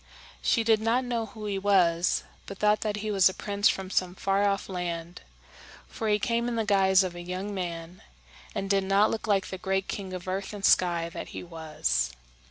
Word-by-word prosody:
She 230 - +2
did 220 -1 +3
not 235 +3 +1
know 235 -2 -2
who 215 0 -9
he 200 -2 -2
was, 180 -4 +3 0.2
but 195 - -7
thought 210 +1 +3
that 210 -1 -1
he 215 - -1
was 195 -2 +5
a 190 - -7
prince 205 0 +1
from 190 -1 -3
some 180 -2 0
far 195 +2 +1
off 195 -1 -1
land; 175 -2 -4 0.7
for 220 - -3
he 210 - +4
came 235 +3 0
in 240 - -2
the 225 -1 0
guise 190 -2 +4
of 185 -2 -3
a 175 - -7
young 185 +3 -4
man, 175 -2 -5 0.5
and 195 - -2
did 195 -1 +2
not 195 +2 +3
look 225 - -3
like 200 -2 +1
the 190 - -5
great 190 +1 -1
king 195 -2 -5
of 185 0 -6
earth 195 +2 -3
and 200 -1 -3
sky 170 -2 +3
that - - -7
he - - -5
was. 155 - -1
195 Hz, 210 wpm, -28 LUFS, 180-210 Hz, 0.7 s, was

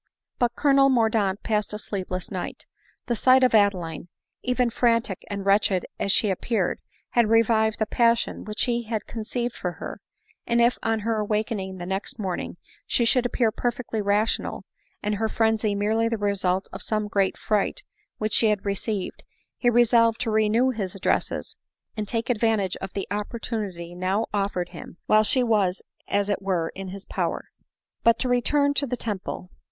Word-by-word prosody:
But 240 -1 +1
Colonel 275 -1 +4
Mordaunt 220 -5 +2
passed 210 -2 -1
a - - -2
sleepless 185 -3 -4
night. 185 -2 -5 0.4
The 240 - 0
sight 255 +3 +5
of 255 - +4
Adeline, 190 -6 +2 0.3
even 250 -1 +1
frantic 230 -5 +1
and 200 -1 -4
wretched 195 -2 +3
as 200 - +1
she 205 0 +3
ap 185 - -3
J 235 - -2
reared, 185 -5 0 0.3
had 235 -3 +3
revived 225 -1 +3
the 220 - +1
passion 235 +1 +1
which 210 0 -1
he 235 -1 0
had 220 -2 -3
conceived 235 +2 -4
or 180 -1 -1
her; - - -8 0.5
and 235 0 +2
if 235 +1 +3
on 225 -1 0
her 225 +1 0
awaking 210 -2 -2
the 175 - -6
next 190 +4 -3
morning 185 -4 -4 0.3
she 235 - +2
should 245 +1 +3
appear 235 -2 +1
perfectly 240 -1 -2
rational, 205 +2 0 0.4
and 210 0 0
hpr 220 0 0
frenzy 220 -2 +1
merely 220 +3 +1
the 230 - -1
result 195 -2 0
of - - -7
some 215 -1 -1
great 195 -2 +1
fright 210 -2 0 0.3
which 215 0 -2
she 225 - +4
had 210 -2 0
received, 200 0 -2 0.3
he 245 - +2
resolved 235 -1 +4
to 225 - 0
renew 220 +4 +3
his 200 -6 -4
addresses, 195 - -1 0.4
and 215 -2 -3
take 230 +2 -2
advantage 220 -5 +1
of 195 -1 -7
the 195 - -3
opportunity 205 -5 -4
now 185 +5 0
offered 195 -3 -1
him, 170 -1 -10
while 215 0 +5
she 250 +4 +3
was 205 -6 +1 0.2
as 200 0 +1
it 205 -1 -1
were 180 -4 0
in 195 0 -7
his 195 +1 -7
power. - - -3 0.5
But 230 0 +5
to 255 - -1
return 285 +4 +2
to 285 0 +1
the 250 0 -2
Temple. 195 -4 -4
215 Hz, 175 wpm, -25 LUFS, 195-235 Hz, 0.5 s, sight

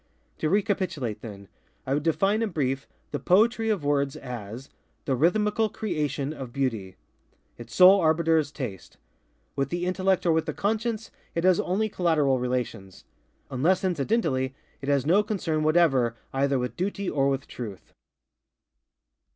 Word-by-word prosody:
To 155 - 0
recapitulate 180 - -1
then:ŌĆöI 105 +5 -9
would 145 - +1
define, 195 +7 +1
in 225 - 0
brief, 135 -5 -2 0.2
the 145 - -2
Poetry 225 +4 +3
of 205 -8 0
words 140 -1 +1
as 120 0 -7 0.4
_The 135 - +1
Rhythmical 210 - +2
Creation 150 - -2
of 135 -5 -8
Beauty. 115 -9 -2 0.6
_Its 120 0 -9
sole 185 +9 +7
arbiter 160 0 +3
is 145 -2 -3
Taste. 120 - -7 0.6
With 135 -1 -1
the 175 +2 -2
Intellect 185 0 +1
or 170 - +4
with 160 0 +1
the - - -3
Conscience 220 +2 -2 0.2
it 170 - 0
has 185 -1 +4
only 205 +4 0
collateral 155 -9 +1
relations. 125 -6 -3 0.5
Unless 175 +9 +2
incidentally, 140 - 0 0.3
it 140 - -4
has 140 -2 +2
no 180 +7 +5
concern 185 -7 -2
whatever 155 -7 +3 0.2
either 135 0 +1
with 125 -2 -3
Duty 200 +1 -2
or 140 -4 +1
with 135 0 -2
Truth. 105 -6 -8
155 Hz, 145 wpm, -26 LUFS, 130-185 Hz, 0.6 s, sole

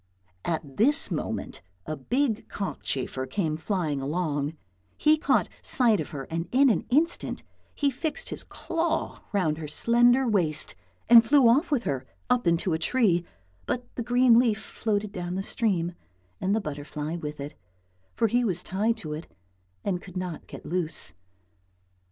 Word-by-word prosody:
At 155 -5 -3
this 285 +2 +3
moment 160 - -3 0.2
a 155 - -3
big 235 - -1
cockchafer 130 - -3
came 160 -4 -1
flying 160 -4 -1
along, 150 0 -1 0.4
he 305 +1 +5
caught 310 - +2
sight 235 -5 +3
of - - -3
her 145 -4 -5
and 165 +4 -4
in 270 0 +5
an - - -1
instant 315 +7 +1 0.3
he 285 -1 +1
fixed 305 +3 -4
his - - -5
claw 330 -1 -2
round 160 -7 +1
her 155 - -5
slender 240 - +4
waist 170 -9 +2 0.3
and 230 0 +9
flew 270 +1 +5
off 275 +9 +4
with 275 -6 +1
her, 135 -7 -2 0.2
up 245 -6 +2
into 170 +1 +2
a 160 - 0
tree, 180 -2 +2 0.4
but 245 -1 -3
the - - -4
green 245 0 +5
leaf 230 -4 +3
floated 210 -2 -2
down 180 -3 -4
the 190 - -2
stream 180 -7 0 0.5
and 195 +2 +1
the 220 - +1
butterfly 150 0 -5
with 150 -2 -6
it, 145 +2 -6 0.6
for 230 - +3
he 240 +3 +2
was 180 -6 0
tied 215 +5 0
to 155 -8 -6
it 155 +3 -6 0.6
and 180 -3 -1
could 185 -1 -9
not 180 -3 -5
get - - -10
loose. 165 -4 -2
195 Hz, 160 wpm, -27 LUFS, 160-240 Hz, 0.6 s, and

